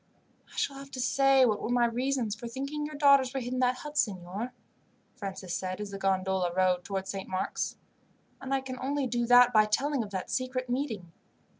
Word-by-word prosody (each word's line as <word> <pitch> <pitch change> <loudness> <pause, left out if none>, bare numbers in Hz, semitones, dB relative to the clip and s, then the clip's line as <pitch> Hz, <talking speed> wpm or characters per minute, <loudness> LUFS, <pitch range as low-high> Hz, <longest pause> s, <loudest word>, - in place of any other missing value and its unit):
"I - - -15
shall 275 - -1
have 275 0 -10
to 260 - -5
say 270 +1 +4
what 215 -3 +1
were - - -3
my 245 -1 +3
reasons 245 -1 0
for 225 +3 -7
thinking 275 +5 -4
your 305 - -8
daughters 280 -3 +5
were - - +1
hid 245 0 -4
in 255 - -1
that 250 0 +3
hut, 295 +3 -4
signor," 195 +4 -2 0.6
Francis 190 -5 -6
said 185 0 -3
as 210 -1 -5
the 195 - -6
gondola 190 -2 +1
rowed 185 -1 +2
towards 195 0 -3
Saint 195 -1 -6
Mark's; 185 0 -2 0.6
"and 270 0 -6
I 270 0 +2
can 255 -1 -7
only 275 +1 -1
do 240 -1 -1
that 245 0 +7
by 215 -1 +6
telling 270 +6 0
of 215 - -5
that 190 -2 -5
secret 255 -1 -2
meeting. 225 - -3
245 Hz, 205 wpm, -29 LUFS, 195-265 Hz, 0.6 s, that